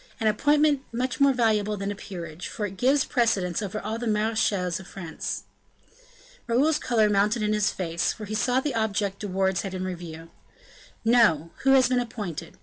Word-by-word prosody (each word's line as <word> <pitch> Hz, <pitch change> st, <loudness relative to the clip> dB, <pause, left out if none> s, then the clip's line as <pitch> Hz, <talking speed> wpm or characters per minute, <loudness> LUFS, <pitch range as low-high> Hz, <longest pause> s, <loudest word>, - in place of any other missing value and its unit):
an 225 Hz, -, -2 dB
appointment 290 Hz, +6 st, +3 dB, 0.4 s
more 280 Hz, 0 st, +6 dB
valuable 215 Hz, -4 st, +1 dB
than 200 Hz, +1 st, -3 dB
a -, -, -5 dB
peerage; 175 Hz, -4 st, -7 dB
for 210 Hz, -, -4 dB
it 195 Hz, -1 st, -6 dB
gives 265 Hz, +7 st, +2 dB
precedence 200 Hz, -8 st, +1 dB
over 205 Hz, +1 st, -4 dB
all 220 Hz, +2 st, -4 dB
the 240 Hz, -, -3 dB
marechals 210 Hz, -5 st, 0 dB
of 190 Hz, -, -11 dB
France." 170 Hz, -5 st, -5 dB, 1.0 s
Raoul's 290 Hz, +6 st, +2 dB
color 225 Hz, -4 st, +2 dB
mounted 210 Hz, +2 st, +2 dB
in 210 Hz, 0 st, +1 dB
his 210 Hz, -1 st, +2 dB
face; 170 Hz, -2 st, -1 dB
for 215 Hz, -, -7 dB
he 210 Hz, -, -6 dB
saw 245 Hz, +4 st, +2 dB
the 280 Hz, 0 st, -2 dB
object 205 Hz, -3 st, -1 dB
De 205 Hz, -, -4 dB
Wardes 190 Hz, -1 st, 0 dB
had 195 Hz, -2 st, -5 dB
in 185 Hz, 0 st, -3 dB
view. 165 Hz, -1 st, -10 dB, 0.7 s
"No; 180 Hz, -10 st, +4 dB
who 270 Hz, 0 st, +4 dB
has 260 Hz, -2 st, +6 dB
been 250 Hz, 0 st, +2 dB
appointed? 205 Hz, -9 st, -5 dB
210 Hz, 180 wpm, -26 LUFS, 185-240 Hz, 1.0 s, more